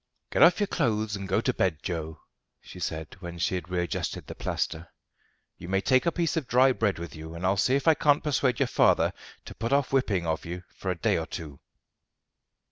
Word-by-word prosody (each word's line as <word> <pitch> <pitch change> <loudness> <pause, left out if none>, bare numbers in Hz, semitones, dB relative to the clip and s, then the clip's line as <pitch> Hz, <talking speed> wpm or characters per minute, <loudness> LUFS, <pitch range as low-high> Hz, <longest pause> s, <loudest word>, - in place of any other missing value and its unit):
"Get - - +1
off 170 +3 +7
your 205 - +3
clothes 110 - 0
and 100 -1 -6
go - - +1
to - - 0
bed, 85 -5 0
Joe," 80 -3 -4 0.4
she - - -12
said 80 -2 -4
when 85 -2 -7
she 85 - 0
had 90 -1 -4
readjusted 90 -1 -2
the - - -7
plaster. 85 +1 -3 0.7
"You 85 - -8
may 95 0 +2
take 130 - +2
a - - +4
piece 170 -1 -1
of 155 -6 -2
dry 130 +2 +5
bread 110 -6 0
with 85 0 -7
you, 80 +1 -8
and 85 +2 -4
I'll 95 +2 +3
see 125 +7 +2
if 140 +2 -1
I 160 - +8
can't 145 -1 +2
persuade 135 -4 +1
your - - +3
father - - +3 0.3
to - - -9
put 115 +4 -4
off 140 -1 +2
whipping 105 -10 +1
of 80 -1 -1
you 90 +1 -6
for 95 - -5
a 90 - 0
day 85 - +1
or 80 - -4
two." 75 -6 -7
95 Hz, 220 wpm, -27 LUFS, 85-130 Hz, 0.7 s, I